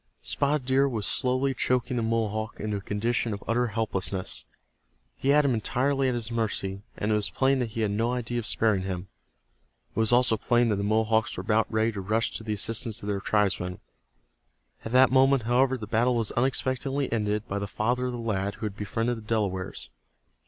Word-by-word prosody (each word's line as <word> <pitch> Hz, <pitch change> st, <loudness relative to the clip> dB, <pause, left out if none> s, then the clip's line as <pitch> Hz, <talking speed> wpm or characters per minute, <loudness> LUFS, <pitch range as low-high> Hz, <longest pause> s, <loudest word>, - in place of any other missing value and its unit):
Spotted 140 Hz, -1 st, 0 dB
Deer 135 Hz, +2 st, +3 dB
was 110 Hz, -6 st, -3 dB
slowly 130 Hz, +3 st, +1 dB
choking 125 Hz, 0 st, 0 dB
the 120 Hz, -, 0 dB
Mohawk 110 Hz, -1 st, -1 dB
into 105 Hz, -1 st, -2 dB
a -, -, -6 dB
condition 110 Hz, +2 st, -1 dB
of 100 Hz, -, -11 dB
utter 120 Hz, +2 st, +2 dB
helplessness. 100 Hz, -4 st, -2 dB, 0.7 s
He 135 Hz, -, -2 dB
had 150 Hz, +1 st, +5 dB
him 135 Hz, -, +3 dB
entirely 135 Hz, +4 st, 0 dB
at 125 Hz, -, 0 dB
his 120 Hz, -1 st, -3 dB
mercy, 100 Hz, -4 st, -2 dB, 0.2 s
and 105 Hz, -, -1 dB
it -, -, +3 dB
was 105 Hz, -5 st, +1 dB
plain 130 Hz, +9 st, +2 dB
that 120 Hz, -2 st, -1 dB
he 115 Hz, +1 st, -4 dB
had 105 Hz, -2 st, +1 dB
no 115 Hz, +4 st, 0 dB
idea 120 Hz, -1 st, -2 dB
of 110 Hz, -, -3 dB
sparing 110 Hz, -4 st, +3 dB
him. 95 Hz, -1 st, -5 dB, 0.9 s
It -, -, -1 dB
was 110 Hz, 0 st, +2 dB
also 120 Hz, -2 st, +4 dB
plain 120 Hz, +2 st, +2 dB
that 105 Hz, -, +1 dB
the 100 Hz, -, -2 dB
Mohawks 110 Hz, +1 st, +1 dB
were -, -, -2 dB
about 110 Hz, +1 st, +1 dB
ready 110 Hz, +1 st, +2 dB
to 100 Hz, -3 st, -5 dB
rush 110 Hz, +4 st, 0 dB
to -, -, -5 dB
the 110 Hz, -1 st, -2 dB
assistance 110 Hz, +1 st, -2 dB
of 105 Hz, -, -4 dB
their 100 Hz, -1 st, 0 dB
tribesman. 95 Hz, -4 st, 0 dB, 1.0 s
At 115 Hz, -, -6 dB
that 130 Hz, 0 st, +6 dB
moment, 135 Hz, -1 st, +4 dB
however, 130 Hz, +3 st, +2 dB
the 110 Hz, -, -6 dB
battle 115 Hz, +4 st, +2 dB
was 115 Hz, -2 st, 0 dB
unexpectedly 130 Hz, +2 st, 0 dB
ended 105 Hz, -1 st, -1 dB
by 100 Hz, -, -2 dB
the 100 Hz, -, -3 dB
father 125 Hz, +5 st, -1 dB
of -, -, -2 dB
the -, -, -4 dB
lad 100 Hz, -3 st, -2 dB
who -, -, -5 dB
had 100 Hz, -2 st, -4 dB
befriended 115 Hz, +3 st, -2 dB
the -, -, -8 dB
Delawares. 100 Hz, -, -2 dB
115 Hz, 205 wpm, -27 LUFS, 105-125 Hz, 1.0 s, that